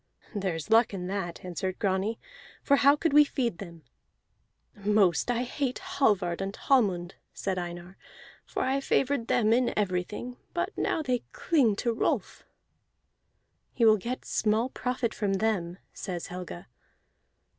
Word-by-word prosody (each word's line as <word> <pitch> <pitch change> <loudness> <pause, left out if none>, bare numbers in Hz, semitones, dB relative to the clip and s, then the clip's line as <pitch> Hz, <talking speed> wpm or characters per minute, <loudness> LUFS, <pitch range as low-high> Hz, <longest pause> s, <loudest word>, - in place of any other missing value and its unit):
"There 195 -5 -1
is 165 +6 -6
luck 225 -2 +5
in 180 -2 -4
that," 185 -3 -4
answered 185 +1 -3
Grani, 195 +3 0 0.5
"for 280 - +4
how 280 +1 +6
could 315 0 0
we 295 +1 +9
feed 245 -9 -2
them?" 170 -5 -9 0.9
"Most 205 -2 +2
I 245 0 +1
hate 255 +1 -2
Hallvard 210 - +1
and 195 +1 -3
Hallmund," 190 -9 +1 0.2
said 190 -2 -2
Einar, 175 +1 -7 0.5
"for - - -3
I 265 +1 +1
favored 270 -3 +1
them 220 -2 +3
in 245 +1 +2
everything, 210 +5 -2 0.2
but 350 +1 -1
now 315 - 0
they 250 -3 0
cling 265 - +2
to 235 +3 0
Rolf." - - -1 1.3
"He 235 - +2
will 215 -1 +7
get 240 +6 -5
small 220 +3 +1
profit 250 -3 -2
from 200 -2 -1
them," 190 -4 0 0.2
says 175 -3 -5
Helga. 180 - -7
215 Hz, 145 wpm, -28 LUFS, 185-250 Hz, 1.3 s, we